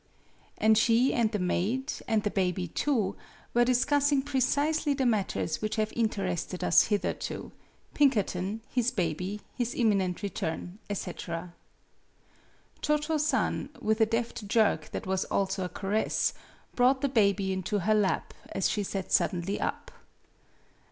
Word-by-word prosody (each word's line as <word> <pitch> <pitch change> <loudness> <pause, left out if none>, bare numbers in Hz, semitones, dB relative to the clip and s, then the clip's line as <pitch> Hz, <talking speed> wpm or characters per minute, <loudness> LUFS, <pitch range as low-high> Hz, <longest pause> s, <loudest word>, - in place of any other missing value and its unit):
AND 220 0 +4
she 235 +3 +3
and 230 -3 +2
the 210 - 0
maid, 210 +9 -1
and 220 -2 +1
the 210 - 0
baby 180 -2 0
too, 210 - 0 0.4
were 240 - +5
discussing 280 +3 +2
precisely 290 +2 +1
the 265 -1 0
matters 200 -7 0
which 215 0 -1
have 215 0 -1
interested 190 -6 -1
us - - +5
hitherto 205 -2 -2 0.4
Pinkerton, 210 -6 +1
his 245 -1 +1
baby, 180 +2 -2
his 240 -2 -2
imminent 200 -6 +1
return, 180 0 -4
etc. 170 -3 -5 1.3
Cho 300 0 +2
Cho 305 +1 -1
San, 300 +1 0
with 220 +1 0
a 220 - +5
deft 230 -2 -2
jerk 215 0 +2
that - - -5
was 190 0 0
also 195 -1 -1
a - - -4
caress, 205 +4 0 0.4
brought 260 +1 +3
the 280 - +2
baby 200 -6 +2
into 190 +2 -1
her 215 +5 +2
lap 205 -5 +1 0.2
as 195 - +1
she 210 - -1
sat 195 -1 -4
suddenly 185 +1 +1
up. - - -3
215 Hz, 140 wpm, -29 LUFS, 190-245 Hz, 1.3 s, were